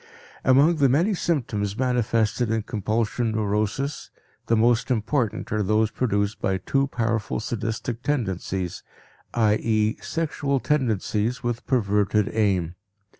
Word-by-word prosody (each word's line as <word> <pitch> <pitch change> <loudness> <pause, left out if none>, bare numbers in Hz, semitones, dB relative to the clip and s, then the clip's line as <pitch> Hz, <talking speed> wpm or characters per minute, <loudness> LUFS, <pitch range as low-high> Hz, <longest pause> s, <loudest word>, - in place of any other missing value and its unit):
Among 140 +6 +5
the 140 -3 +4
many 170 - +3
symptoms 110 - -1
manifested 120 -2 +1
in 110 -1 0
compulsion 110 +1 -1
neurosis, 110 +6 -1 0.4
the 115 - +3
most 115 +1 +3
important 120 0 -1
are 105 0 +1
those 110 +2 +2
produced 100 -4 -1
by 95 -1 +1
too 135 +9 0
powerful 115 -4 -1
sadistic 115 +1 -3
tendencies, 95 - -2 0.5
i.e., 110 -1 +2
sexual 145 -4 -1
tendencies 115 -4 0
with 120 -1 -3
perverted 105 -4 +2
aim. 95 -6 +1
115 Hz, 115 wpm, -24 LUFS, 105-125 Hz, 0.5 s, Among